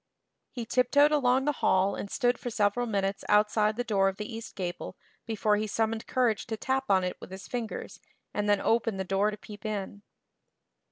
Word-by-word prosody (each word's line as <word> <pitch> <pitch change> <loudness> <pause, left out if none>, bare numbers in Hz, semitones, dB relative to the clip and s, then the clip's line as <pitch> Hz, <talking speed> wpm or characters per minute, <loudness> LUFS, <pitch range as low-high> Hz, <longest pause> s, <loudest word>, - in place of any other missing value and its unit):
He 240 -3 -6
tiptoed 255 +5 +4
along 265 -2 +3
the 295 - +3
hall 190 +1 +3
and 200 - -5
stood 245 +1 +1
for 245 - -4
several 220 +2 +1
minutes 195 -2 -1
outside 210 +1 +3
the 245 - -1
door 195 -5 +2
of 195 - -7
the 210 - -4
east 225 - -8
gable 180 0 -5 0.3
before 215 -1 +1
he 215 +1 -1
summoned 225 +1 -1
courage 240 -5 +1
to 220 - -3
tap 265 +4 -1
on 190 -2 +4
it 180 - -3
with - - -9
his 190 +1 -9
fingers 235 -3 -5 0.3
and 205 0 -1
then 205 -1 +4
open 225 -2 +1
the 190 - -1
door 195 +2 +1
to 210 - -6
peep 210 0 -12
in. 205 -2 -4
215 Hz, 200 wpm, -29 LUFS, 200-240 Hz, 0.3 s, tiptoed